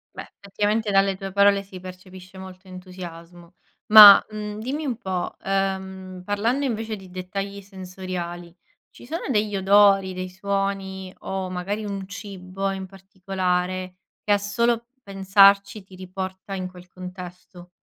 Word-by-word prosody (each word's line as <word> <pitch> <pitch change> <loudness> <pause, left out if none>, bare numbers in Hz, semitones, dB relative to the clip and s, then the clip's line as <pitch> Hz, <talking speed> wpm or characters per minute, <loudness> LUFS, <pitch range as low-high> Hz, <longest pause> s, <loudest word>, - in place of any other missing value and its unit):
Beh, - - -8
effettivamente, 205 +2 -1
dalle 195 0 +3
tue 195 0 -7
parole 200 0 +4
si 190 -1 -11
percepisce 185 0 -12
molto 190 0 -12
entusiasmo. 175 -2 -11 0.3
Ma, 210 -2 +11
mhmm, 210 0 -6
dimmi 275 +7 -4
un 250 -5 -2
po', 190 -5 -4
uhm, 190 -1 -3
parlando 230 +8 0
invece 225 -3 -3
di 190 -2 -13
dettagli 195 +2 -5
sensoriali, 185 -3 -7 0.3
ci - - -15
sono 325 +7 -5
degli 210 -4 0
odori, 195 0 +4
dei 185 0 -5
suoni, 190 0 -3
o, 190 -1 -4
magari, 195 +4 -4
un 195 -2 -5
cibo 195 -1 -5
in 190 0 -5
particolare, 185 -1 -3 0.3
che 210 - -1
a - - +4
solo 235 +3 0 0.2
pensarci, 200 +1 +4
ti 190 0 -16
riporta 190 +1 -7
in 185 -1 -4
quel 180 0 -14
contesto? 180 -1 -10
190 Hz, 140 wpm, -23 LUFS, 185-200 Hz, 0.3 s, Ma